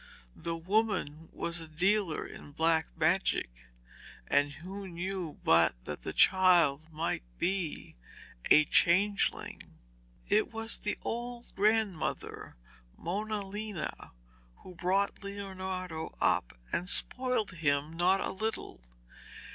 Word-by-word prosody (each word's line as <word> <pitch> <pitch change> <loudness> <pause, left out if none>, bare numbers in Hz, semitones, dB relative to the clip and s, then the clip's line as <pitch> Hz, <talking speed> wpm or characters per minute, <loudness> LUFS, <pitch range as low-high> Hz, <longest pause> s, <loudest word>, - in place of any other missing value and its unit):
The 165 0 -4
woman 180 -4 0
was 170 0 -2
a 165 - -8
dealer 180 +2 +1
in 145 - -11
black 160 +1 +2
magic, 160 - +2 0.7
and 145 - +2
who 190 +6 -8
knew 180 -2 -4
but 80 -4 +5
that 75 - -5
the - - -4
child 170 -5 +4
might 160 +2 -2 0.2
be 185 -4 -1 0.5
a 150 - +7
changeling? 200 +7 +2 0.7
It 215 +3 +2
was 225 0 -2
the 210 - -2
old 240 +1 -5
grandmother, 210 - 0 0.4
Mona 210 +3 -3
Lena, 205 -3 -5 0.5
who 185 - -10
brought 190 +4 0
Leonardo 190 -4 -5
up - - +1 0.2
and 180 +2 0
spoilt 250 -4 0
him 150 -2 0
not 180 +3 +3
a - - -2
little. 220 - -3
185 Hz, 110 wpm, -31 LUFS, 160-205 Hz, 0.7 s, a